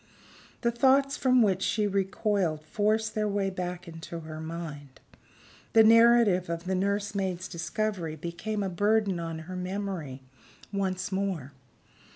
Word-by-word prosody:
The 235 - +2
thoughts 270 +3 +3
from 255 -3 +4
which 195 -3 +1
she 210 +1 +1
recoiled 195 -4 0
forced 215 +4 0
their 215 -1 0
way 200 -1 0
back 180 -1 -5
into 165 0 -7
her 155 0 -8
mind; 160 -4 -7 0.7
the 225 - +8
narrative 230 -5 +5
of 170 0 -3
the 190 +1 -2
nursemaid's 195 -1 -1
discovery 170 0 -3
became 185 +7 -4
a - - -1
burden 205 0 +1
on 165 -1 -4
her 185 +2 -7
memory 180 -8 -4 0.5
once 190 -1 -2
more. 190 -8 -2
190 Hz, 135 wpm, -28 LUFS, 170-215 Hz, 0.7 s, the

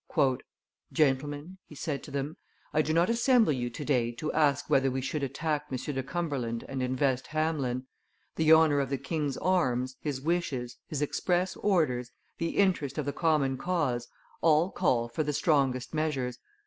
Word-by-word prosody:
"Gentlemen," 145 +5 0
he 150 - -12
said 145 -1 -3
to - - -10
them, 140 +3 -3 0.4
"I 155 - +4
do 155 - -1
not 170 +2 +3
assemble 235 - +4
you 120 -2 -2
to 140 +5 -7
day 120 -2 +2
to 150 +6 -4
ask 150 -3 +2
whether 135 0 +3
we 130 +1 -2
should 135 +3 -2
attack 150 +2 -2
M. 130 - -1
de 135 +1 -3
Cumberland 135 -6 -3
and 135 -1 -3
invest 130 0 0
Hameln. 155 -5 -1 0.5
The 160 -1 +3
honor 160 -3 +6
of 135 -2 -1
the 140 - 0
king's 145 0 -2
arms, 130 -8 +1
his 145 -4 -3
wishes, 135 -6 -2
his 150 -1 -2
express 180 +5 0
orders, 150 -12 +1 0.3
the 165 0 -2
interest 175 -9 +2
of 150 - -1
the 145 - -2
common 145 -5 +1
cause, 145 -10 -1 0.3
all 165 +3 +4
call 125 -9 +1
for 120 +7 -3
the 150 -1 -1
strongest 135 -4 +1
measures. 145 -6 -1
145 Hz, 170 wpm, -29 LUFS, 130-160 Hz, 0.5 s, honor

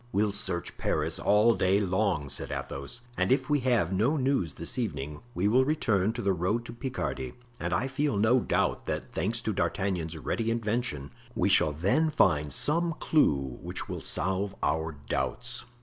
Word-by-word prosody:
"We'll 105 +1 +2
search 95 -4 -2
Paris - - 0
all 105 +3 +4
day 95 -1 +2
long," 95 -6 0
said - - -3
Athos, 70 - -4 0.2
"and 95 +4 +1
if 140 +3 +2
we 145 - +4
have 120 -9 +1
no 115 +11 +2
news 130 - 0
this 85 +10 -3
evening 75 - -3
we 90 +3 +1
will 125 +5 +5
return 110 -9 +1
to 120 -1 -4
the 100 -1 +2
road 95 +7 -1
to - - -8
Picardy; 120 - -4 0.3
and 85 +1 -2
I 120 +10 +1
feel 140 -3 0
no 110 +5 +4
doubt - - 0
that, - - -3
thanks 110 +7 -2
to 110 - -1
D'Artagnan's 90 -4 -1
ready 115 -1 -2
invention, 115 - -1 0.2
we - - +2
shall 75 - +4
then 100 - +2
find 75 - +2
some 165 - +1
clew 70 - +2
which - - -5
will - - -5
solve 95 +1 -1
our 80 +2 0
doubts." 120 - -2
100 Hz, 175 wpm, -29 LUFS, 85-125 Hz, 0.3 s, will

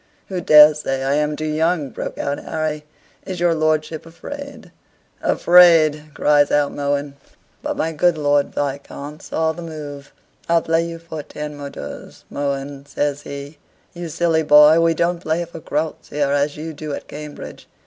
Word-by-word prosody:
"Who 185 -2 -3
dares 150 -1 +7
say 135 -2 -2
I 135 +1 +1
am 150 0 0
too 155 - -4
young?" 155 -2 0
broke - - -6
out 140 0 -2
Harry. 155 -1 -3 0.4
"Is 185 -2 -6
your 175 -1 +3
lordship 155 0 0
afraid?" 240 +4 -9 0.5
"Afraid!" 165 -4 +5
cries 145 -1 +3
out 145 -1 +2
Mohun. 140 0 -2 0.4
But - - -3
my 165 - 0
good 165 +1 +2
Lord 145 -1 +2
Viscount 145 +1 -5
saw 160 0 -1
the 165 +2 -8
move 145 -4 -8 0.4
"I'll 170 -1 +3
play 165 0 +1
you 170 0 -6
for 165 -2 -7
ten 150 +1 -7
moidores, 140 -1 -9
Mohun," 140 0 -4
says 145 0 -2
he. 140 +1 -8 0.3
"You 175 -1 -6
silly 160 +1 +1
boy, 150 +1 +7
we 165 0 +3
don't 170 +1 0
play 165 0 -1
for 165 0 -10
groats 160 0 -3
here 145 -1 0
as 145 +1 0
you 160 +1 -6
do 150 -1 -5
at - - -9
Cambridge." 150 0 -9
150 Hz, 165 wpm, -20 LUFS, 145-165 Hz, 0.5 s, dares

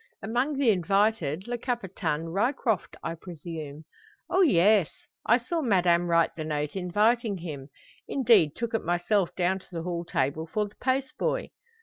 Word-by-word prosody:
"Among 250 +6 0
the 265 -5 +4
invited 195 -2 +1
Le 240 0 -3
Capitaine 190 - -2
Ryecroft, 220 - 0
I 165 - -2
presume?" 160 -3 -8 0.5
"O 380 - +4
yes. 205 - +4 0.4
I 235 - +6
saw 320 +7 -3
madame 175 - +3
write 170 -1 +3
the 160 - -4
note 150 0 -3
inviting 210 +4 +1
him 150 -6 -7 0.4
indeed 220 - +4
took 235 -1 -4
it 225 - 0
myself 175 +2 +1
down 185 +1 +1
to - - -20
the 165 -2 -4
hall 175 -1 -3
table 155 0 -1
for 210 +5 -1
the 205 - -18
post 270 +3 0
boy." - - -1
190 Hz, 155 wpm, -27 LUFS, 165-235 Hz, 0.5 s, I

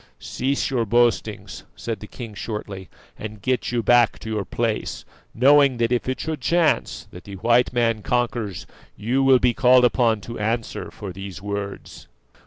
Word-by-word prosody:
"Cease 135 +2 -2
your 125 -3 +1
boastings," 120 +1 0
said 115 -3 -5
the 105 - -10
king 115 -2 -9
shortly, 100 -3 -6 0.3
"and 110 -1 -7
get 130 -1 0
you 120 -1 -1
back 120 -2 +4
to 110 - -7
your 105 -2 -1
place, 115 -2 -3 0.3
knowing 140 +1 +5
that 115 0 0
if 125 +1 0
it 130 - -2
should 155 -3 -4
chance 165 +3 +1
that 90 - -11
the 100 - -8
white 120 +5 +2
man 115 -3 +1
conquers 120 -5 -2 0.3
you 120 +6 0
will 135 -1 +6
be 125 -1 +2
called 125 +1 +5
upon 115 -3 +2
to 115 +3 -8
answer 115 +2 -2
for 100 -4 -8
these 95 0 -8
words." 100 0 -6
115 Hz, 170 wpm, -22 LUFS, 105-125 Hz, 0.3 s, will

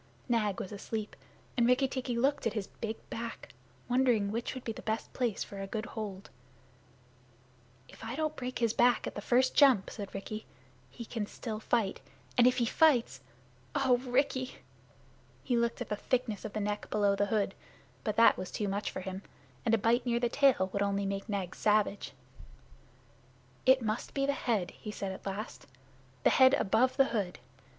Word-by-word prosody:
Nag 215 -5 +1
was 190 - -5
asleep, 210 +1 -5 0.4
and 235 -2 +3
Rikki 255 +2 +4
tikki 255 -2 -3
looked 275 +1 +2
at 230 - -2
his 210 -4 -2
big 225 +1 -5
back, 230 0 -6 0.3
wondering 245 -5 +2
which 230 +4 -3
would 255 - -7
be 225 - -3
the - - -8
best 220 +1 -3
place 240 -5 -1
for 200 -1 -8
a 195 - -4
good 215 +2 -3
hold. 205 -5 -6 1.6
"If - - -14
I 225 +3 -4
don't 310 0 -1
break 255 0 -4
his 230 -2 +1
back 245 -1 +3
at - - -4
the 205 - -5
first 255 +4 +3
jump," 260 -9 +5
said 200 -3 -7
Rikki, 215 +2 -6 0.4
"he 235 - -9
can 220 -2 -3
still 220 -1 -5
fight. 220 -3 0 0.3
And 245 0 +6
if 250 - +3
he 240 - +2
fights 240 - +3 0.5
O 260 -3 +4
Rikki!" 255 +1 0 0.9
He 250 - 0
looked 235 +1 0
at 245 - -4
the 210 - 0
thickness 230 -1 -1
of 215 - -5
the 215 - -2
neck 210 0 -3
below 205 -1 +2
the 205 +1 +1
hood, 200 -2 0 0.5
but 210 - -1
that 230 +1 +6
was 185 - -5
too 210 - -2
much 200 +2 -2
for - - -5
him; 190 0 -5 0.5
and 225 - +5
a - - +1
bite 230 +4 +2
near 235 0 +2
the 240 0 +1
tail 240 -9 +3
would 200 - 0
only 200 0 0
make 195 +2 -3
Nag 195 -3 -2
savage. 210 -1 +1 1.5
"It 260 -1 +6
must 215 +1 -3
be 275 0 +1
the 280 - +1
head"' 225 -9 -1
he 215 - -9
said 200 -2 -4
at 190 - -8
last; 205 +4 -5 0.6
"the - - +5
head 260 +1 +6
above 230 +6 +2
the 270 - +6
hood. 195 -5 -1
225 Hz, 190 wpm, -31 LUFS, 205-250 Hz, 1.6 s, And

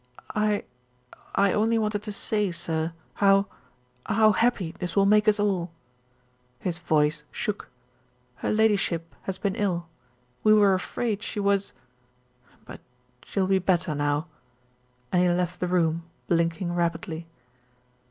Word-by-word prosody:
"I 210 -1 +1 0.7
I 200 -1 +3
only 225 +2 +2
wanted 210 -2 0
to 210 0 -6
say, 210 0 0
sir, 165 -1 -2 0.2
how 195 0 +4 0.6
how 220 0 +5
happy 215 -7 +1
this 180 0 -5
will 200 -1 +4
make 210 +1 +4
us 215 0 +4
all." 190 -4 0 0.9
His 175 +5 -3
voice 150 -2 +1
shook. 210 -1 -4 0.7
"Her - - -3
Ladyship 200 -6 +1
has 190 -1 -3
been 200 -1 -1
ill, 180 -6 -1 0.6
we 215 0 +6
were 205 -2 +5
afraid 210 +3 -2
she - - -4
was 200 -1 +1 0.9
but - - -10 0.4
she'll 195 -2 -1
be 190 0 +3
bet 180 -1 +2
ter 170 -4 -3
now," 145 +1 0 0.9
and 180 - +3
he 180 - +4
left 175 0 -1
the 180 - -1
room, 170 -2 +1 0.3
blinking 170 +1 0
rapidly. 170 -1 -2
190 Hz, 135 wpm, -26 LUFS, 170-210 Hz, 0.9 s, we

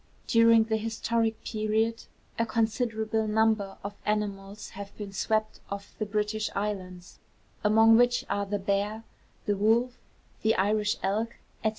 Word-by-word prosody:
During 230 -1 +6
the 220 0 0
historic 225 0 -1
period 220 +1 0 0.3
a 230 - +3
considerable 220 -1 0
number 215 -2 +1
of 200 +1 -5
animals 205 -1 -3
have 200 0 -9
been 205 -2 -7
swept 215 +2 0
off 200 0 -6
the 215 - -1
British 210 +1 -1
Islands, 185 -3 -4 0.4
among 225 +1 +6
which 245 0 +3
are 200 0 -1
the 205 +1 -1
bear, 205 +3 -1 0.4
the 205 - +1
wolf, 230 +5 +2 0.4
the 220 +1 +3
Irish 210 +2 +1
elk, 220 +4 -1 0.3
&c. 220 - +4
215 Hz, 135 wpm, -28 LUFS, 205-225 Hz, 0.4 s, During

